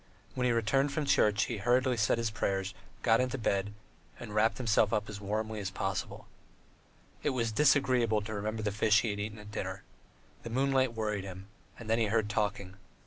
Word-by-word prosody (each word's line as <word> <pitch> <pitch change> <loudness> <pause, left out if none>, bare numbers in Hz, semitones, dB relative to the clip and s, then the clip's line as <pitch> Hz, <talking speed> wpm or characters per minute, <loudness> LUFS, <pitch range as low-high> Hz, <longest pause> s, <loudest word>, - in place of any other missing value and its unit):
When 125 - -1
he 125 - +3
returned 125 +5 +2
from 155 0 -1
church, 105 -6 +3
he 120 - -3
hurriedly 125 +5 +2
said 105 0 +2
his 115 -2 -1
prayers, 95 -2 -1 0.3
got 115 +2 +4
into 130 +1 -1
bed, 100 -4 0 0.5
and 110 -3 -8
wrapped 110 +2 +2
himself 110 -4 +2
up 105 -2 0
as 105 -1 -7
warm 110 +2 -2
as 105 -3 -3
possible. 95 0 -4 1.0
It - - +1
was 115 -2 0
disagreeable 125 -4 +3
to 110 +1 -6
remember 110 +1 -3
the 105 - 0
fish 105 +1 +3
he 115 - -1
had 100 - -5
eaten 105 +1 -4
at 105 0 -11
dinner. - - -5 0.6
The 115 - -7
moonlight 130 0 +1
worried 105 -3 -2
him, 95 +1 -9 0.3
and 115 - -10
then 115 +1 +2
he 115 - +3
heard 110 0 +1
talking. 100 -2 -2
110 Hz, 195 wpm, -31 LUFS, 105-120 Hz, 1.0 s, got